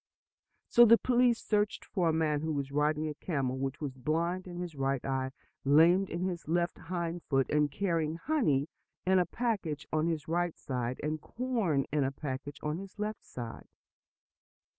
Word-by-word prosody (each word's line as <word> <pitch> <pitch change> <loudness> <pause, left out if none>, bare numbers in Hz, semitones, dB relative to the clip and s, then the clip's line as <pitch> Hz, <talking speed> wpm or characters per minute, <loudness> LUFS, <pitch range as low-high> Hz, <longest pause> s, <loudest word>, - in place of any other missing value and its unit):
So 240 - +7
the 230 0 +8
police 245 -1 +3
searched 210 -1 0
for 180 -5 +1
a - - +2
man 155 -2 +1
who 160 0 -1
was 140 -1 -3
riding 150 +2 +1
a 150 - -3
camel 135 -5 -2
which 135 +1 -3
was 145 -4 -3
blind 170 +7 -1
in 175 -1 -7
his 175 -2 -4
right 135 -2 -1
eye, 130 -1 -1 0.3
lame 165 +7 +6
in 170 +1 -3
his 180 -4 -3
left 170 +1 0
hind 170 0 -3
foot, 135 -3 +3
and 150 -1 +3
carrying 165 -1 0
honey 165 - +1 0.4
in 190 0 +4
a 180 - +2
package 200 -11 -2
on 155 +1 +2
his 160 -4 -2
right 175 +1 0
side, 125 -1 -3
and 155 0 -2
corn 225 - 0
in 150 -2 +3
a 135 - 0
package 140 0 -5
on 150 +3 -1
his 195 +1 -10
left 210 +1 -3
side. 120 -2 -8
160 Hz, 180 wpm, -31 LUFS, 140-185 Hz, 0.4 s, the